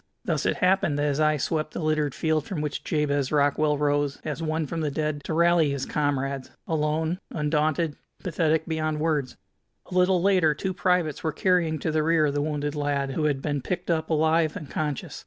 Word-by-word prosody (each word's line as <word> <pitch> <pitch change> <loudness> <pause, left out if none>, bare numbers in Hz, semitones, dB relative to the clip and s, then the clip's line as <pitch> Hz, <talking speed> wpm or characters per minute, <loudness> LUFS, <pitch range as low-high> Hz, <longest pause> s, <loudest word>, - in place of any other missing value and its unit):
Thus - - 0
it - - +1
happened 185 -7 +2
that 145 - 0
his 145 0 0
eye 155 0 +3
swept 155 +2 -2
the - - -2
littered 155 -3 0
field 155 -2 0
from 185 - -4
which 150 -1 -3
Jabez 145 -3 0
Rockwell 150 0 +2
rose, 145 -1 0
as 155 +1 -3
one 160 0 -1
from 165 +3 -4
the 150 - 0
dead, 150 0 -2
to - - -2
rally 170 -2 +4
his 140 -1 -2
comrades, 140 -2 -1 0.2
alone, 160 +2 0
undaunted, 150 0 0 0.2
pathetic 160 -2 0
beyond 155 -1 -1
words. 150 -5 -1 0.5
A - - -5
little 180 0 +4
later 180 -5 +3
two 190 +5 -3
privates 180 -4 0
were 160 - 0
carrying 170 -1 +1
to 155 +2 -2
the 155 0 +1
rear 155 -2 +3
the 145 0 -1
wounded 145 -1 -2
lad, 145 -2 -1
who 150 +3 -1
had 140 -3 0
been 145 -2 -1
picked 175 +5 -3
up 160 -1 -1
alive 160 0 +2
and 150 - -9
conscious. 150 -3 -3
155 Hz, 195 wpm, -26 LUFS, 145-160 Hz, 0.5 s, rally